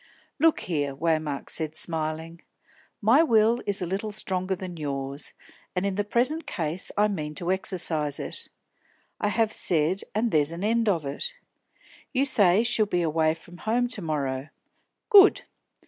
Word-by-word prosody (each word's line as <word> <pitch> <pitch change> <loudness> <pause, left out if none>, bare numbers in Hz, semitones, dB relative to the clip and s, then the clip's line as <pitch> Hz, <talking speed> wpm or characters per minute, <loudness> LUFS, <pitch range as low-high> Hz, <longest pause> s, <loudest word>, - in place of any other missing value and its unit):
"Look 325 +1 +3
here," 145 -5 -2
Waymark 155 -2 -1
said, 155 -1 -2
smiling, 160 +1 -2 0.6
"my 235 +9 +6
will 230 -4 +3
is 200 -2 -1
a - - -1
little 195 +5 -3
stronger 190 -2 -1
than 185 -2 -7
yours, 140 -1 -4 0.4
and 180 +2 0
in 200 - 0
the 205 +2 -1
present 255 +10 0
case 165 0 -2
I 210 +1 +4
mean 155 -7 -4
to 175 +4 -1
exercise 165 -6 0
it. - - -4 0.7
I - - 0
have 220 +1 +1
said, 170 +3 +1
and 225 +1 +1
there's 150 0 +2
an 170 +3 -6
end 225 +1 +2
of 165 -6 0
it. 485 - -4 0.8
You 270 +1 +2
say 205 -6 +4
she'll 230 -3 +2
be 180 -3 0
away 160 0 +1
from 175 +1 -14
home 235 +5 0
to 240 -5 -2
morrow. 140 -4 -2 0.6
Good. 405 -2 +7
180 Hz, 160 wpm, -26 LUFS, 155-215 Hz, 0.8 s, Good